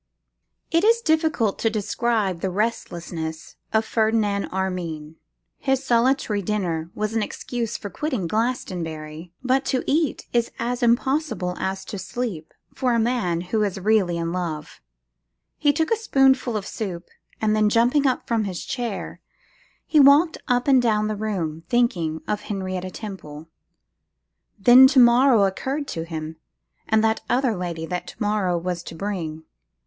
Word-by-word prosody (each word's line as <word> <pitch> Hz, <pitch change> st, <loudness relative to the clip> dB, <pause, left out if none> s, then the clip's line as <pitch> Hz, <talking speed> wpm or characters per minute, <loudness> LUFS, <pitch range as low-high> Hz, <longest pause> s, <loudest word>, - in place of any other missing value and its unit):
_ -, -, -1 dB
IT 335 Hz, -, +4 dB
IS 460 Hz, +2 st, +5 dB
difficult 315 Hz, -, +1 dB
to 225 Hz, -, +2 dB
describe 215 Hz, -3 st, -1 dB
the 190 Hz, -, -1 dB
restlessness 170 Hz, -6 st, -4 dB, 0.2 s
of 220 Hz, 0 st, +2 dB
Ferdinand 215 Hz, -3 st, +1 dB
Armine. 170 Hz, -5 st, -4 dB, 0.4 s
His 270 Hz, 0 st, 0 dB
solitary 240 Hz, -3 st, +2 dB
dinner 175 Hz, -5 st, -2 dB
was 215 Hz, +1 st, -2 dB
an 225 Hz, -, +2 dB
excuse 235 Hz, +2 st, -4 dB
for 205 Hz, -, -7 dB
quitting 260 Hz, -, -2 dB
Glastonbury: 165 Hz, -7 st, -3 dB
but 260 Hz, +1 st, +2 dB
to 255 Hz, -, 0 dB
eat 305 Hz, -1 st, 0 dB
is 235 Hz, -1 st, +2 dB
as 245 Hz, +2 st, -2 dB
impossible 240 Hz, -, +1 dB
as 190 Hz, 0 st, -3 dB
to 200 Hz, -, -6 dB
sleep, 185 Hz, -5 st, -5 dB, 0.2 s
for 250 Hz, -2 st, 0 dB
a -, -, +2 dB
man 220 Hz, -8 st, 0 dB
who 195 Hz, +5 st, -1 dB
is 200 Hz, -2 st, -1 dB
really 190 Hz, -4 st, +2 dB
in 165 Hz, 0 st, -2 dB
love. 165 Hz, -4 st, -5 dB, 0.8 s
He 290 Hz, -, +4 dB
took 320 Hz, +5 st, -1 dB
a -, -, +5 dB
spoonful 270 Hz, -, +2 dB
of 200 Hz, -, -5 dB
soup, 185 Hz, -5 st, -5 dB, 0.3 s
and 215 Hz, -1 st, +1 dB
then 215 Hz, -1 st, +3 dB
jumping 245 Hz, +6 st, +3 dB
up 255 Hz, -, -1 dB
from 225 Hz, -3 st, 0 dB
his 185 Hz, -3 st, -5 dB
chair, 240 Hz, -6 st, -4 dB, 0.6 s
he 310 Hz, -, +3 dB
walked 290 Hz, +4 st, +6 dB
up 245 Hz, -1 st, +1 dB
and 265 Hz, -2 st, +6 dB
down 215 Hz, -2 st, +1 dB
the 215 Hz, -, -2 dB
room, 185 Hz, -7 st, -3 dB
thinking 175 Hz, -11 st, +1 dB
of 210 Hz, 0 st, -1 dB
Henrietta 185 Hz, -3 st, -4 dB
Temple. 165 Hz, -7 st, -9 dB, 1.1 s
Then 245 Hz, +6 st, +8 dB
to 265 Hz, 0 st, +4 dB
morrow 240 Hz, -2 st, +6 dB
occurred 265 Hz, +9 st, -2 dB
to 165 Hz, 0 st, -4 dB
him, 160 Hz, -1 st, -6 dB, 0.5 s
and 220 Hz, 0 st, +3 dB
that 220 Hz, 0 st, +1 dB
other 250 Hz, -3 st, +2 dB
lady 170 Hz, -3 st, -4 dB
that 180 Hz, +1 st, -4 dB
to -, -, -9 dB
morrow 205 Hz, -4 st, +1 dB
was 175 Hz, 0 st, -3 dB
to -, -, -8 dB
bring. 160 Hz, -4 st, -4 dB
215 Hz, 155 wpm, -23 LUFS, 180-245 Hz, 1.1 s, Then